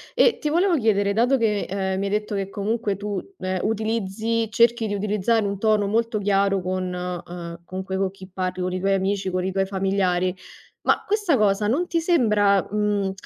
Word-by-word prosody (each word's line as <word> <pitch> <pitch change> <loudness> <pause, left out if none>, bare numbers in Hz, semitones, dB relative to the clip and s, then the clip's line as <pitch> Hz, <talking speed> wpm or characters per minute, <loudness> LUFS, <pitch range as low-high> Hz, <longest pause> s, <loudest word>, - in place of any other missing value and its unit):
E 480 0 +4
ti 300 - -1
volevo 350 +3 +3
chiedere 205 -6 +2
dato 245 +5 +3
che, 210 -3 0
ehm, 190 0 -1
mi 200 - -1
hai 200 - -2
detto 210 +1 -1
che 195 -1 -2
comunque 210 +1 -1
tu, 205 -1 -3 0.2
ehm, 185 0 -2
utilizzi 220 +1 -1
cerchi 230 0 +3
di 205 - -2
utilizzare 210 +2 +1
un 200 -1 -3
tono 215 -1 +2
molto 225 +2 0
chiaro 195 -1 +2
con 185 0 -2
ehm, 175 -1 -6
comunque 190 +1 -5
co' 195 0 +1
chi 190 0 -13
parli, 185 -1 -2
con 180 0 -2
i 185 - -2
tuoi 195 +1 +1
amici, 195 0 -1
con 185 0 -1
i 190 - -1
tuoi 195 0 0
familiari, 190 -2 0 0.5
ma - - +2
questa 410 - +2
cosa 210 0 +2
non 310 +10 +1
ti 335 -1 0
sembra, 210 - +3
mhmm, 205 -2 0
200 Hz, 195 wpm, -23 LUFS, 190-225 Hz, 0.5 s, E